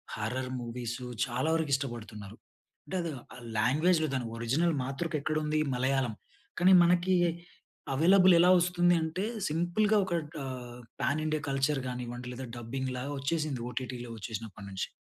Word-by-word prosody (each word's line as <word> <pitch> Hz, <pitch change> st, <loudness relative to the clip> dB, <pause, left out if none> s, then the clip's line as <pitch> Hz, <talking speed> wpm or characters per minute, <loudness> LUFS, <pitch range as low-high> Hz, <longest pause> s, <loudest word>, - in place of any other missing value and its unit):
Horror 125 Hz, +4 st, -3 dB
movies 120 Hz, +1 st, -5 dB, 0.2 s
చాలా 130 Hz, +5 st, -1 dB
వరకు 160 Hz, -3 st, -1 dB
ఇష్టపడుతున్నారు. 110 Hz, -6 st, -6 dB, 0.5 s
అంటే 190 Hz, -, -5 dB
అది 170 Hz, -2 st, -3 dB, 0.2 s
ఆహ్, 125 Hz, -, -11 dB, 0.2 s
లాంగ్వేజ్‌లో 155 Hz, +7 st, +3 dB
దాని 125 Hz, -2 st, -1 dB
ఓరిజినల్ 150 Hz, +9 st, +1 dB
మాతృక 140 Hz, +6 st, -3 dB
ఎక్కడుంది? 155 Hz, 0 st, 0 dB, 0.2 s
మలయాళం. 130 Hz, -1 st, +1 dB, 0.5 s
కానీ 185 Hz, +2 st, +6 dB
మనకి 180 Hz, +2 st, +3 dB, 0.8 s
అవెైలబుల్ 185 Hz, +5 st, +6 dB
ఎలా 180 Hz, +2 st, +6 dB
వస్తుంది 175 Hz, 0 st, +3 dB
అంటే, 160 Hz, +4 st, -2 dB, 0.3 s
సింపుల్‌గా 175 Hz, +7 st, +2 dB
ఒక 185 Hz, -, -8 dB, 0.3 s
ఆహ్, 125 Hz, -2 st, -7 dB, 0.2 s
పాన్ 150 Hz, +2 st, +1 dB
ఇండియా 155 Hz, -1 st, 0 dB
కల్చర్, 135 Hz, +1 st, +1 dB
గానివ్వండి 125 Hz, 0 st, -5 dB
లేదా, 130 Hz, +1 st, -6 dB
డబ్బింగ్ 130 Hz, +3 st, -4 dB
లాగా 140 Hz, +3 st, -4 dB
వచ్చేసింది. 150 Hz, -2 st, -1 dB
ఓటిటిలో 125 Hz, -1 st, -5 dB
వచ్చేసినప్పటినుంచి. 100 Hz, -3 st, -5 dB
135 Hz, 130 wpm, -30 LUFS, 120-165 Hz, 0.8 s, కానీ